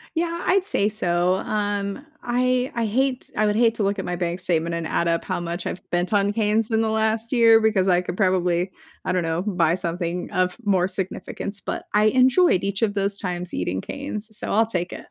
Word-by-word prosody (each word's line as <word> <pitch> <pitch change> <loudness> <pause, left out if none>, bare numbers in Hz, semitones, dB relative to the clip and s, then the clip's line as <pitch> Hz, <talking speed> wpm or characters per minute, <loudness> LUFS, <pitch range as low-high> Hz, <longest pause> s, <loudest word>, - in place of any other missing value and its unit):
Yeah, 335 +1 -1
I'd 385 0 +3
say 205 - +1
so. 180 -3 +1
Um, 205 +4 -2 0.2
I 250 +1 +1
I 235 -1 -1
hate 255 +4 0
I 215 - +2
would 210 0 +1
hate 230 -1 +3
to 225 - -1
look 200 0 0
at - - -3
my 180 - -2
bank 175 0 -2
statement 170 -2 0
and 170 -1 -3
add 170 0 0
up 165 0 0
how - - -2
much 175 +1 -4
I've - - -3
spent 175 +4 -2
on 205 0 +3
Cane's 220 +1 +1
in 220 0 +2
the 220 - +1
last 220 +2 0
year, 230 -2 +6
because 210 -4 +2
I 180 -1 +4
could 180 0 -5
probably, 185 -2 +1 0.3
I - - -1
don't 180 -1 +1
know, 165 +1 -1
buy 175 -5 +1
something 175 0 -3
of 180 0 0
more 190 -3 +2
significance, 195 +1 -5
but - - -4
I 210 +1 +4
enjoyed 255 - +4
each 200 +2 -2
of 210 -2 +2
those 200 0 -1
times 180 -2 -4
eating 90 +1 -2
Cane's, 220 -6 -6
so - - -1
I'll 225 +2 +4
take 175 -5 -2
it. - - -9
200 Hz, 220 wpm, -23 LUFS, 180-225 Hz, 0.3 s, year